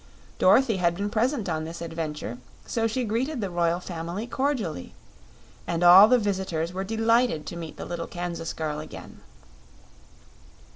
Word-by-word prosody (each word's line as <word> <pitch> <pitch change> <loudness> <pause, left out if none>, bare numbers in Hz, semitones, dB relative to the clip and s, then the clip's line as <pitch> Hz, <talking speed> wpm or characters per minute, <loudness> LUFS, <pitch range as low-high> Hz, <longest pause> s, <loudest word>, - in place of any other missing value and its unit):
Dorothy 220 +3 +4
had 170 -2 +1
been 200 +2 -3
present 235 0 0
on 160 -2 -2
this 165 +2 -7
adventure, 155 -7 -5 0.3
so 225 -1 0
she 245 +3 -2
greeted 245 +6 -1
the 200 -4 -3
royal 170 0 +1
family 175 +4 -5
cordially; 245 - -2 0.7
and 170 0 -1
all 180 +4 +10
the 250 +2 +5
visitors 190 -6 -2
were 190 +1 -3
delighted 225 -5 +1
to 170 - -6
meet 165 -2 -7
the - - -6
little 170 -1 -5
Kansas 175 -2 -4
girl 150 -2 -3
again. 155 - -10
180 Hz, 150 wpm, -26 LUFS, 165-225 Hz, 0.7 s, all